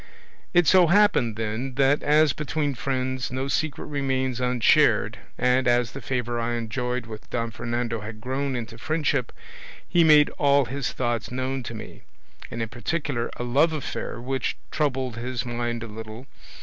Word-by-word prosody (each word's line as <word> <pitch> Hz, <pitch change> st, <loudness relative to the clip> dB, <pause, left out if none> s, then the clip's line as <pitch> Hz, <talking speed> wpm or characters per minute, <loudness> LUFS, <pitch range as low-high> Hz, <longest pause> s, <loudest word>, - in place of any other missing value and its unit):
It 175 Hz, -1 st, +4 dB
so 180 Hz, +1 st, +6 dB
happened, 180 Hz, -, +4 dB
then, 115 Hz, +4 st, -3 dB
that 140 Hz, +2 st, +3 dB
as 150 Hz, 0 st, +4 dB
between 150 Hz, -1 st, -1 dB
friends 130 Hz, 0 st, -2 dB
no 130 Hz, +1 st, -2 dB
secret 145 Hz, +1 st, -1 dB
remains 130 Hz, -3 st, -1 dB
unshared, 125 Hz, -2 st, +3 dB, 0.2 s
and 125 Hz, +1 st, +2 dB
as 120 Hz, -2 st, +3 dB
the 135 Hz, -, -8 dB
favour 120 Hz, -3 st, -2 dB
I 120 Hz, +1 st, -1 dB
enjoyed 125 Hz, +2 st, -2 dB
with 110 Hz, -1 st, -10 dB
Don 115 Hz, -1 st, -2 dB
Fernando 115 Hz, 0 st, -3 dB
had 110 Hz, +1 st, -8 dB
grown 130 Hz, +3 st, -2 dB
into 115 Hz, -1 st, -6 dB
friendship, 150 Hz, -5 st, 0 dB, 0.6 s
he 175 Hz, -1 st, +4 dB
made 150 Hz, -2 st, +6 dB
all 140 Hz, -1 st, +4 dB
his 135 Hz, +2 st, -3 dB
thoughts 120 Hz, -4 st, -2 dB
known 130 Hz, +1 st, -2 dB
to 120 Hz, -1 st, -7 dB
me, 110 Hz, -, -9 dB, 0.5 s
and 115 Hz, 0 st, -3 dB
in 110 Hz, -, -5 dB
particular 125 Hz, +1 st, -2 dB
a -, -, -3 dB
love 145 Hz, +7 st, +3 dB
affair 145 Hz, -5 st, -4 dB
which 130 Hz, +2 st, -2 dB
troubled 130 Hz, -6 st, -1 dB
his 125 Hz, +1 st, -3 dB
mind 120 Hz, -1 st, -2 dB
a -, -, -6 dB
little. 110 Hz, +3 st, -8 dB
125 Hz, 160 wpm, -25 LUFS, 120-140 Hz, 0.6 s, so